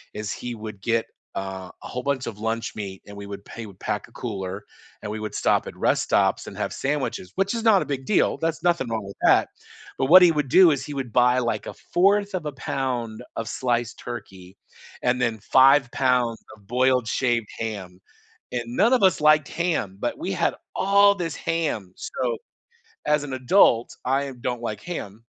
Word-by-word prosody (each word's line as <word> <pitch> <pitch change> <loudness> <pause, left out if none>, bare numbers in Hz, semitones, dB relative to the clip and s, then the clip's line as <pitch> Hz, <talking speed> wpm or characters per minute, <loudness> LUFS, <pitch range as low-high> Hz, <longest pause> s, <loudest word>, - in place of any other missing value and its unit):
is 105 -1 -4
he 120 -1 -6
would 105 -3 -8
get, 115 +1 +1 0.3
uh, 95 -1 -5
a - - -7
whole 125 - -4
bunch 140 -2 -1
of 105 -3 -6
lunch 115 +1 -3
meat, 95 -3 -6
and 100 - -10
we 100 - -7
would 100 0 -8
pay 115 - -9
we - - -8
would 95 - -15
pack - - -3
a - - -23
cooler, 100 -3 -5 0.4
and 105 - -4
we 110 - -4
would 110 0 -5
stop - - +1
at - - -9
rest - - +2
stops - - +1
and - - -9
have - - -2
sandwiches 125 -9 -2
which 195 +3 +1
is 230 - -3
not 215 -5 +5
a - - -10
big 135 -2 -4
deal, 210 - +2
that's 165 +1 -2
nothing 170 -7 +2
wrong 110 -2 -2
with 100 - -9
that, - - +5 0.5
but 135 - +1
what 185 +5 +9
he 170 - +7
would 150 -4 -1
do 180 0 +7
is, 140 - -1
he 150 - -6
would 130 -5 -4
buy, 125 0 +4
like, 115 -4 -2
1/4 200 +3 +1
of 170 -4 -4
a - - -3
pound 125 -4 -3
of 115 - -3
sliced 120 -2 -1
turkey, 95 -6 -9 0.5
and 125 0 +1
then 115 -3 +1
5 135 +5 +5
pounds 125 -3 +1 0.2
of 105 -2 -23
boiled 125 0 +2
shaved 120 -3 0
ham, 100 -5 -5 0.5
and 120 -1 -2
none 200 - +3
of 250 - +3
us 185 -4 +4
liked 155 -1 +5
ham, 165 - -1
but - - -2
we - - -3
had - - 0 0.2
all 200 +1 +5
this 170 -5 -3
ham, 145 - -2
so, - - -2 0.7
as 150 -1 +2
an 140 - -6
adult, 130 - +3
I 135 +1 0
don't 125 -2 -2
like 105 -3 -4
ham, 115 - -7
125 Hz, 205 wpm, -24 LUFS, 110-150 Hz, 0.7 s, what